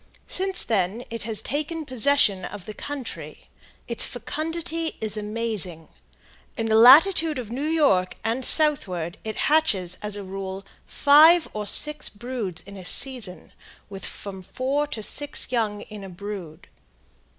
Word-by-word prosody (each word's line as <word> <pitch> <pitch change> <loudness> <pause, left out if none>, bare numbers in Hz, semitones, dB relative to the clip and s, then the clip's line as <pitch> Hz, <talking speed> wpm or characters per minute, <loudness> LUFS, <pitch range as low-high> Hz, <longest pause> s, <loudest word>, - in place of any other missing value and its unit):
Since 380 0 -1
then 210 +1 -1
it 230 - -5
has 220 - -1
taken 310 +2 -3
possession 255 -6 +2
of 195 +1 -8
the 215 - -7
country. 275 +2 -7 0.4
Its - - +3
fecundity 325 +1 -4
is 215 -1 -2
amazing. 210 -6 -1 0.7
In 225 - -2
the 220 -1 +1
latitude 305 - +6
of 235 -4 -6
New 275 +5 -3
York 280 - +2
and 230 +4 -2
southward 190 - +3
it 220 0 -5
hatches, 200 - +1
as 210 -1 -3
a 205 - -6
rule, 190 0 -7 0.2
five 315 +4 +6
or 210 -1 -4
six 300 +7 +1
broods 215 -5 -6
in 200 0 -11
a 185 - -9
season, 230 -2 0 0.4
with 195 -1 -8
from 195 -2 -8
four 270 +9 -2
to 225 -7 -6
six 290 +3 +1
young 215 -4 -1
in 210 -2 -10
a 195 - -8
brood. 185 -3 -8
225 Hz, 145 wpm, -24 LUFS, 195-290 Hz, 0.7 s, latitude